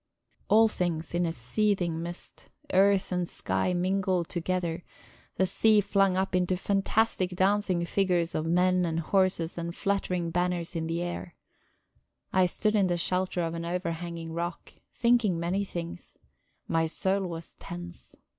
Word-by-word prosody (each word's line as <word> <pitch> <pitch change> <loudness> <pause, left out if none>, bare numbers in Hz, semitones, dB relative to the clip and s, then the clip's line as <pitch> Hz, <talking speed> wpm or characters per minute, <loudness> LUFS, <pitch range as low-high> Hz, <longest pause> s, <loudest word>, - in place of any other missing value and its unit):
All 225 +1 +6
things 175 -6 -2
in 175 0 +1
a - - -1
seething 170 - 0
mist. 175 +1 -8 0.2
Earth 195 0 +4
and 180 -1 -1
sky 180 - -1
mingled 185 -1 0
together, 175 -1 -2 0.5
the 190 - +2
sea 215 +3 +4
flung 195 -2 +2
up 190 -1 0
into 180 0 +1
fantastic 195 -1 +1
dancing 190 -2 +2
figures 175 -2 +1
of 155 +1 -1
men 180 +2 +3
and 165 -1 -1
horses 175 -1 +1
and 170 0 -4
fluttering 180 -4 -1
banners 175 0 -1
on 160 -1 -2
the 170 +1 -1
air. 175 0 -5 1.0
I 185 -1 +4
stood 215 +4 0
in 200 -3 +3
the 175 -1 0
shelter 180 +1 0
of 165 0 -2
an 170 0 -4
overhanging 170 -1 -4
rock, 170 +1 -4 0.2
thinking 235 -7 +2
many 180 +4 0
things; 170 -3 -7 0.5
my 165 0 +1
soul 190 +3 0
was 165 -1 -7
tense. 85 -7 -8
180 Hz, 145 wpm, -28 LUFS, 170-190 Hz, 1.0 s, All